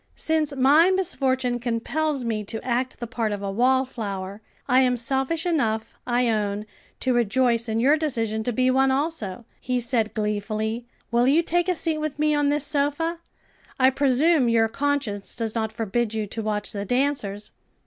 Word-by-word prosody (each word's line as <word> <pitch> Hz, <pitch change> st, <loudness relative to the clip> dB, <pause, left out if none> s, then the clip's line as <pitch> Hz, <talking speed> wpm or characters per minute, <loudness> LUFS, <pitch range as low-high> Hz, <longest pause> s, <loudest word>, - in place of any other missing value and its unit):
"Since 310 Hz, -3 st, 0 dB
my 290 Hz, +7 st, +5 dB
misfortune 260 Hz, -10 st, 0 dB
compels 255 Hz, +4 st, -1 dB
me 220 Hz, -2 st, -1 dB
to 225 Hz, +2 st, -4 dB
act 255 Hz, +1 st, -1 dB
the 240 Hz, -, -4 dB
part 230 Hz, -2 st, -2 dB
of 205 Hz, -1 st, -4 dB
a 200 Hz, -, -2 dB
wallflower, 220 Hz, -5 st, -1 dB, 0.3 s
I 255 Hz, -1 st, +4 dB
am 250 Hz, -1 st, +3 dB
selfish 270 Hz, +7 st, -1 dB
enough, 230 Hz, -10 st, -1 dB
I 245 Hz, 0 st, +2 dB
own, 210 Hz, -2 st, -1 dB, 0.4 s
to 260 Hz, -, +1 dB
rejoice 240 Hz, 0 st, +2 dB
in 220 Hz, +1 st, 0 dB
your 280 Hz, +6 st, +4 dB
decision 225 Hz, -8 st, -1 dB
to 245 Hz, -, 0 dB
be 255 Hz, +2 st, +2 dB
one 265 Hz, +1 st, +3 dB
also," 265 Hz, -, -2 dB
he 250 Hz, -1 st, -1 dB
said 235 Hz, -2 st, 0 dB
gleefully. 215 Hz, +2 st, -2 dB, 0.2 s
"Will 240 Hz, +1 st, +3 dB
you 310 Hz, +5 st, +4 dB
take 350 Hz, +2 st, +1 dB
a 365 Hz, -, +2 dB
seat 320 Hz, -1 st, -1 dB
with 305 Hz, -2 st, -3 dB
me 305 Hz, 0 st, +2 dB
on 290 Hz, -1 st, +2 dB
this 295 Hz, 0 st, +1 dB
sofa? 300 Hz, +3 st, 0 dB, 0.6 s
I 260 Hz, 0 st, +5 dB
presume 275 Hz, +1 st, +3 dB
your 225 Hz, -1 st, +3 dB
conscience 270 Hz, -6 st, -2 dB
does 225 Hz, -2 st, -3 dB
not 220 Hz, -2 st, -2 dB
forbid 225 Hz, +1 st, -2 dB
you 215 Hz, -1 st, -1 dB
to 225 Hz, +3 st, -5 dB
watch 210 Hz, -1 st, -3 dB
the 200 Hz, -2 st, -4 dB
dancers?" 215 Hz, -4 st, -1 dB
245 Hz, 175 wpm, -24 LUFS, 220-285 Hz, 0.6 s, my